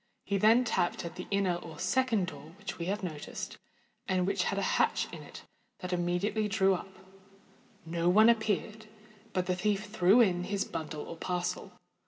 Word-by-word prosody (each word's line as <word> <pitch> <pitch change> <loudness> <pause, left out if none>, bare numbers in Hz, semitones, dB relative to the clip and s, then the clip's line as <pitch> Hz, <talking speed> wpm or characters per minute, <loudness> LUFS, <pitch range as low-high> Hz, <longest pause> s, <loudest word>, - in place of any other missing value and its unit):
He 200 -1 0
then 225 +5 +6
tapped 175 -7 0
at 170 - -5
the 180 - -7
inner 195 -3 +1
or 165 -3 -10
second 230 - +1
door 165 -2 -10
which 205 -3 -7
we 170 - -3
have 200 +1 -2
noticed, 155 -5 -6 0.5
and 185 -1 +1
which 195 -1 0
had 195 - -1
a 200 - 0 0.2
hatch - - +2
in - - -7
it - - -11 0.3
that 180 -1 -5
immediately 180 +5 0
drew 195 -2 +3
up: 190 +1 -5 0.9
no 170 +1 0
one 215 +5 +7
appeared—but 215 -2 -1
the 180 0 0
thief 205 +2 0
threw 205 +2 +5
in 180 -6 +3
his 200 +1 -1
bundle 155 -1 -5
or 165 - -8
parcel. 180 +1 -3
195 Hz, 175 wpm, -31 LUFS, 175-215 Hz, 0.9 s, one